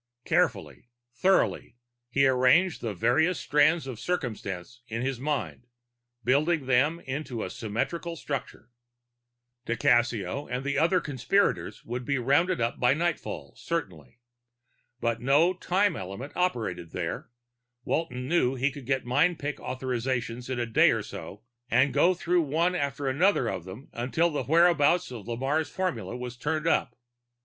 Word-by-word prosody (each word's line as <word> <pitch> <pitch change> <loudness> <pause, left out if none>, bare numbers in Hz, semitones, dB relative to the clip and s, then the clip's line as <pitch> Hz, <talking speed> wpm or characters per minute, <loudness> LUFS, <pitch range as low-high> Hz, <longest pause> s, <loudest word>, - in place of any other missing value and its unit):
Carefully, 120 - 0 0.2
thoughtfully, 185 -6 +1 0.3
he 135 +2 +3
arranged 130 +8 +4
the 110 -4 -3
various 145 - +2
strands 155 +2 +3
of 130 -5 -6
circumstance 120 - -4
in 115 +1 -3
his 130 -2 -2
mind, 135 -3 -3 0.6
building 145 +4 +2
them 135 +6 +2
into 130 -4 -4
a 90 - -5
symmetrical 165 +10 -3
structure. 130 -5 -6 1.0
Di 120 - 0
Cassio 120 +1 +1
and 125 +2 -3
the 140 0 -1
other 170 +3 +3
conspirators 150 +9 0
would 125 +2 -4
be 140 +2 0
rounded 145 +8 +2
up 115 0 -1
by 125 +2 +4
nightfall, 170 +1 -3
certainly. 90 - -5 0.8
But 115 -1 -1
no 145 +8 +4
time 190 +3 +1
element 100 +10 -7
operated 115 - -2
there; 90 +5 -4 0.6
Walton 130 -6 -2
knew 135 -5 +2
he 135 +2 +1
could 135 -2 -10
get 135 -2 0
mind 150 +8 +2
pick 145 -1 -4
authorizations 125 -1 -3
in 130 -2 -2
a 120 - 0
day 115 - +4
or - - 0
so, 105 +3 -9 0.3
and 130 +4 +3
go 185 +1 +4
through 175 0 +1
one 165 +4 +1
after 140 -4 -2
another 145 0 +2
of 90 - -3
them 100 +9 -10
until 145 +8 0
the 145 -4 -2
whereabouts 165 +1 +4
of 115 -4 -8
Lamarre's 135 +7 -1
formula 125 - -3
turned 150 +6 -3
up. 165 - +1
135 Hz, 145 wpm, -27 LUFS, 120-160 Hz, 1.0 s, arranged